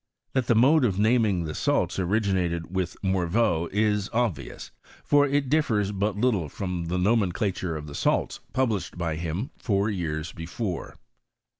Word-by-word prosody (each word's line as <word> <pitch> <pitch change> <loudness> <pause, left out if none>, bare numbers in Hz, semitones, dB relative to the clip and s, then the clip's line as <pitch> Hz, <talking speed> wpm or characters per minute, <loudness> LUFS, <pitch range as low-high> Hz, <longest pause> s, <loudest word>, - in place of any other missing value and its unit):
That 130 -2 0
the 120 - +4
mode 135 +6 +5
of 100 -6 +1
naming 110 -4 +3
the 80 -1 -4
salts - - 0
originated 95 -3 0
with 90 -2 -2
Mor 95 -2 +1
veau 85 -4 +1
is 105 0 +1
obvious; 100 - -2 0.3
for 145 0 +4
it 140 0 +1
differs 115 -9 +1
but 100 0 -1
little 105 - +1
from 90 0 -4
the 85 +2 -2
nomenclature 95 -3 0
of 75 - -7
the 75 - -9
salts - - 0
published 115 -9 -1
by 80 -3 -2
him 85 - -3
four 100 -1 +1
yean 80 -5 -2
before. 85 +3 -5
100 Hz, 155 wpm, -26 LUFS, 85-115 Hz, 0.3 s, mode